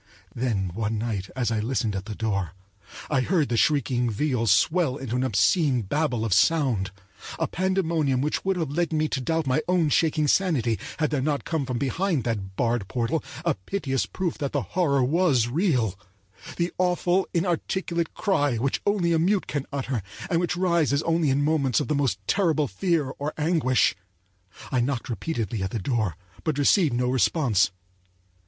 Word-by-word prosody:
Then 105 Hz, -7 st, -1 dB
one 110 Hz, +2 st, -2 dB
night 105 Hz, -4 st, -3 dB
as 120 Hz, -4 st, 0 dB
I 110 Hz, -, 0 dB
listened 115 Hz, -2 st, -1 dB
at 95 Hz, 0 st, -4 dB
the 110 Hz, -1 st, -6 dB
door, 100 Hz, -6 st, -2 dB, 0.5 s
I 135 Hz, -4 st, +1 dB
heard 160 Hz, +1 st, +1 dB
the 120 Hz, -, 0 dB
shrieking 125 Hz, 0 st, +2 dB
viol 120 Hz, +1 st, 0 dB
swell 160 Hz, -, +3 dB
into 125 Hz, -3 st, -4 dB
a 130 Hz, +1 st, 0 dB
chaotic 125 Hz, -, +2 dB
babel 135 Hz, -7 st, 0 dB
of 110 Hz, -, +1 dB
sound; 115 Hz, -, +2 dB, 0.5 s
a -, -, 0 dB
pandemonium 165 Hz, -7 st, 0 dB
which 150 Hz, +3 st, -1 dB
would 190 Hz, 0 st, +1 dB
have 160 Hz, -6 st, -2 dB
led 170 Hz, +3 st, 0 dB
me 155 Hz, -1 st, +1 dB
to 130 Hz, -, -2 dB
doubt 160 Hz, +4 st, 0 dB
my 135 Hz, +3 st, +1 dB
own 175 Hz, -4 st, +2 dB
shaking 155 Hz, 0 st, +2 dB
sanity 135 Hz, -, +2 dB, 0.2 s
had 155 Hz, -2 st, 0 dB
there 145 Hz, -3 st, 0 dB
not 145 Hz, +1 st, -1 dB
come 155 Hz, -5 st, -2 dB
from 125 Hz, -2 st, -2 dB
behind 155 Hz, -, 0 dB
that 100 Hz, -5 st, -3 dB
barred 115 Hz, -3 st, 0 dB
portal 120 Hz, +7 st, -1 dB, 0.2 s
a 170 Hz, -, +3 dB
piteous 135 Hz, -, -2 dB
proof 180 Hz, -3 st, -3 dB
that 140 Hz, -2 st, -3 dB
the 145 Hz, -3 st, 0 dB
horror 140 Hz, -8 st, +2 dB
was 140 Hz, -4 st, +2 dB
real—the 110 Hz, -, -2 dB
awful, 180 Hz, +1 st, +2 dB
inarticulate 170 Hz, -1 st, -1 dB
cry 145 Hz, -, +1 dB
which 135 Hz, +4 st, -1 dB
only 185 Hz, -5 st, +2 dB
a 165 Hz, -, +3 dB
mute 190 Hz, +4 st, +2 dB
can 145 Hz, -2 st, -3 dB
utter, 135 Hz, -4 st, -2 dB, 0.3 s
and 165 Hz, -, +3 dB
which 175 Hz, 0 st, -1 dB
rises 170 Hz, -5 st, +2 dB
only 165 Hz, -2 st, +1 dB
in 135 Hz, +2 st, +2 dB
moments 140 Hz, -6 st, +2 dB
of -, -, -2 dB
the 155 Hz, -, 0 dB
most 140 Hz, -8 st, +1 dB
terrible 160 Hz, -, +2 dB
fear 165 Hz, -4 st, 0 dB
or 145 Hz, +2 st, -3 dB
anguish. 150 Hz, -, +2 dB, 0.8 s
I 130 Hz, -, +1 dB
knocked 125 Hz, 0 st, -2 dB
repeatedly 115 Hz, -, -3 dB
at 95 Hz, -, -1 dB
the 115 Hz, -, -3 dB
door, 110 Hz, -, -1 dB, 0.3 s
but 155 Hz, -3 st, -1 dB
received 145 Hz, -, +3 dB
no 125 Hz, +1 st, +1 dB
response. 125 Hz, -, +2 dB
140 Hz, 175 wpm, -25 LUFS, 115-165 Hz, 0.8 s, swell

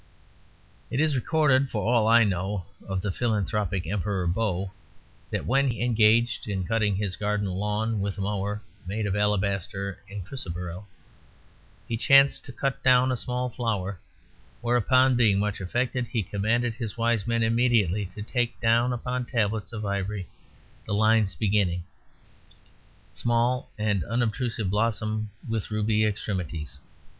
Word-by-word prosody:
It 125 Hz, -, -2 dB
is 155 Hz, -1 st, +3 dB
recorded 140 Hz, 0 st, +2 dB
(for 105 Hz, -4 st, -2 dB
all 115 Hz, -2 st, +3 dB
I 115 Hz, +1 st, +7 dB
know) 95 Hz, -1 st, -1 dB, 0.2 s
of 95 Hz, -1 st, -2 dB
the 100 Hz, -, 0 dB
philanthropic 105 Hz, -4 st, -1 dB
Emperor 95 Hz, +1 st, -1 dB
Bo, 95 Hz, 0 st, -1 dB, 0.6 s
that -, -, -3 dB
when 135 Hz, +1 st, +3 dB
engaged 115 Hz, -1 st, +2 dB
in 95 Hz, -3 st, -2 dB
cutting 105 Hz, +1 st, +1 dB
his 95 Hz, -1 st, -2 dB
garden 105 Hz, 0 st, -1 dB
lawn 105 Hz, +3 st, -1 dB
with 100 Hz, 0 st, -2 dB
a -, -, -3 dB
mower 105 Hz, +1 st, -2 dB, 0.2 s
made 105 Hz, +3 st, -2 dB
of 100 Hz, -1 st, -1 dB
alabaster 100 Hz, -2 st, -1 dB
and 100 Hz, -2 st, -6 dB
chrysoberyl, 90 Hz, -5 st, -6 dB, 1.0 s
he 115 Hz, -, -2 dB
chanced 135 Hz, +3 st, +5 dB
to -, -, -7 dB
cut 135 Hz, +3 st, -2 dB
down 130 Hz, 0 st, +5 dB
a -, -, +1 dB
small 125 Hz, +1 st, -2 dB
flower; 105 Hz, -6 st, -2 dB, 0.6 s
whereupon, 125 Hz, +2 st, +3 dB
being 110 Hz, -5 st, +4 dB
much 105 Hz, 0 st, -1 dB
affected, 120 Hz, +5 st, -1 dB
he 115 Hz, -4 st, -1 dB
commanded 115 Hz, +5 st, 0 dB
his 115 Hz, -3 st, -6 dB
wise 115 Hz, -2 st, +1 dB
men 115 Hz, -1 st, +1 dB
immediately 110 Hz, -5 st, +2 dB
to 105 Hz, -, -5 dB
take 120 Hz, +1 st, -1 dB
down 115 Hz, +2 st, +3 dB
upon 125 Hz, +1 st, -2 dB
tablets 110 Hz, -4 st, -1 dB
of 110 Hz, -2 st, -5 dB
ivory 100 Hz, -1 st, -2 dB, 0.6 s
the 100 Hz, -, -1 dB
lines 110 Hz, -3 st, +3 dB
beginning: 95 Hz, -2 st, +1 dB, 1.3 s
"Small 120 Hz, +2 st, +1 dB
and 105 Hz, -4 st, 0 dB
unobtrusive 115 Hz, -2 st, -1 dB
blossom 110 Hz, 0 st, 0 dB, 0.2 s
with 110 Hz, -2 st, -2 dB
ruby 110 Hz, 0 st, +1 dB
extremities." 90 Hz, -8 st, -3 dB
105 Hz, 140 wpm, -26 LUFS, 100-120 Hz, 1.3 s, I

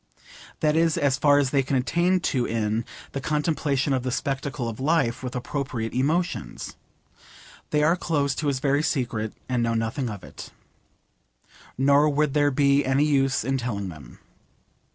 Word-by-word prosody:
That 155 Hz, -1 st, +2 dB
is 165 Hz, -1 st, +2 dB
as 135 Hz, -1 st, +1 dB
far 145 Hz, -1 st, +5 dB
as 140 Hz, -2 st, +2 dB
they 140 Hz, -, +3 dB
can 135 Hz, +1 st, -2 dB
attain 170 Hz, +9 st, +1 dB
to 125 Hz, -6 st, 0 dB
in 110 Hz, 0 st, -1 dB, 0.3 s
'the 135 Hz, -, -4 dB
contemplation 150 Hz, -1 st, 0 dB
of 130 Hz, -, +1 dB
the 130 Hz, -, -3 dB
spectacle 135 Hz, -1 st, -2 dB
of 115 Hz, 0 st, -5 dB
life 140 Hz, -4 st, +1 dB
with 125 Hz, 0 st, -5 dB
appropriate 125 Hz, -3 st, -3 dB
emotions.' 160 Hz, +7 st, -1 dB, 0.9 s
They 150 Hz, 0 st, +2 dB
are 165 Hz, +3 st, +4 dB
close 145 Hz, -6 st, 0 dB
to 150 Hz, -, -1 dB
his 140 Hz, -2 st, +1 dB
very 140 Hz, +1 st, +2 dB
secret 115 Hz, -8 st, -1 dB, 0.2 s
and 125 Hz, -2 st, 0 dB
know 115 Hz, 0 st, 0 dB
nothing 115 Hz, +3 st, -1 dB
of 105 Hz, -2 st, -7 dB
it. -, -, -10 dB, 1.3 s
Nor 140 Hz, +3 st, +4 dB
would 150 Hz, -1 st, +1 dB
there 145 Hz, -1 st, +3 dB
be 140 Hz, 0 st, +3 dB
any 135 Hz, +3 st, +2 dB
use 135 Hz, -3 st, +2 dB
in 135 Hz, 0 st, 0 dB
telling 100 Hz, -6 st, -3 dB
them. 75 Hz, -8 st, -12 dB
135 Hz, 165 wpm, -25 LUFS, 125-150 Hz, 1.3 s, far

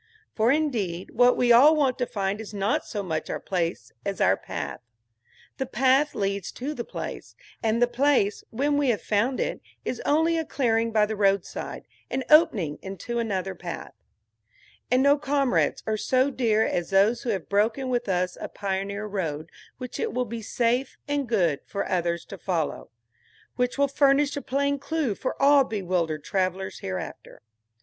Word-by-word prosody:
For 225 Hz, +2 st, +3 dB
indeed, 225 Hz, -, -1 dB
what 245 Hz, +1 st, +4 dB
we 245 Hz, -1 st, +3 dB
all 280 Hz, +7 st, +8 dB
want 270 Hz, -5 st, +1 dB
to 245 Hz, -, 0 dB
find 200 Hz, +1 st, -2 dB
is 210 Hz, -1 st, -9 dB
not 200 Hz, +3 st, 0 dB
so 205 Hz, -3 st, -4 dB
much 160 Hz, -4 st, -3 dB
our -, -, -2 dB
place 175 Hz, -2 st, -2 dB
as 200 Hz, -1 st, -3 dB
our 95 Hz, -, +4 dB
path. -, -, -6 dB, 0.8 s
The 265 Hz, -, -1 dB
path 265 Hz, +4 st, +2 dB
leads 200 Hz, -1 st, -2 dB
to 275 Hz, +5 st, -4 dB
the 240 Hz, -, -4 dB
place, -, -, -7 dB, 0.3 s
and 225 Hz, +1 st, +1 dB
the 245 Hz, -, +4 dB
place, 245 Hz, -4 st, +2 dB
when 285 Hz, +5 st, 0 dB
we 285 Hz, -2 st, +2 dB
have 225 Hz, -, 0 dB
found 230 Hz, +5 st, +1 dB
it, -, -, -2 dB, 0.2 s
is 250 Hz, -, -3 dB
only 325 Hz, +3 st, +2 dB
a -, -, -1 dB
clearing 230 Hz, -6 st, 0 dB
by 215 Hz, -1 st, +4 dB
the 215 Hz, +1 st, -4 dB
roadside, 200 Hz, -2 st, -1 dB, 0.2 s
an 265 Hz, 0 st, -2 dB
opening 215 Hz, -, +4 dB
into 195 Hz, +5 st, -4 dB
another 195 Hz, -4 st, -2 dB
path. -, -, -7 dB, 1.0 s
And 255 Hz, +1 st, +3 dB
no 285 Hz, +1 st, +5 dB
comrades 280 Hz, -3 st, +1 dB
are 220 Hz, 0 st, 0 dB
so 260 Hz, +5 st, +2 dB
dear 225 Hz, -4 st, +2 dB
as 175 Hz, -, -2 dB
those 205 Hz, +5 st, +3 dB
who 245 Hz, -, -4 dB
have 195 Hz, -6 st, -2 dB
broken 220 Hz, +6 st, +1 dB
with 245 Hz, -4 st, -1 dB
us 180 Hz, -1 st, -1 dB
a -, -, -4 dB
pioneer 200 Hz, +1 st, -3 dB
road 165 Hz, -6 st, -4 dB, 0.3 s
which 250 Hz, -1 st, -7 dB
it -, -, -2 dB
will 250 Hz, 0 st, 0 dB
be 230 Hz, 0 st, -6 dB
safe 245 Hz, +4 st, 0 dB
and 285 Hz, -3 st, -1 dB
good 175 Hz, -11 st, +2 dB
for 200 Hz, -, -3 dB
others 170 Hz, -1 st, -1 dB
to 195 Hz, -, -10 dB
follow; 165 Hz, -4 st, -2 dB, 0.7 s
which 250 Hz, +1 st, 0 dB
will 280 Hz, 0 st, +3 dB
furnish 280 Hz, +1 st, +3 dB
a 285 Hz, -, -3 dB
plain 280 Hz, +1 st, 0 dB
clue 295 Hz, -5 st, -1 dB
for 255 Hz, -, -4 dB
all 280 Hz, 0 st, +6 dB
bewildered 180 Hz, -, -2 dB
travelers 190 Hz, +1 st, -2 dB
hereafter. 185 Hz, -, -7 dB
225 Hz, 175 wpm, -26 LUFS, 195-265 Hz, 1.0 s, all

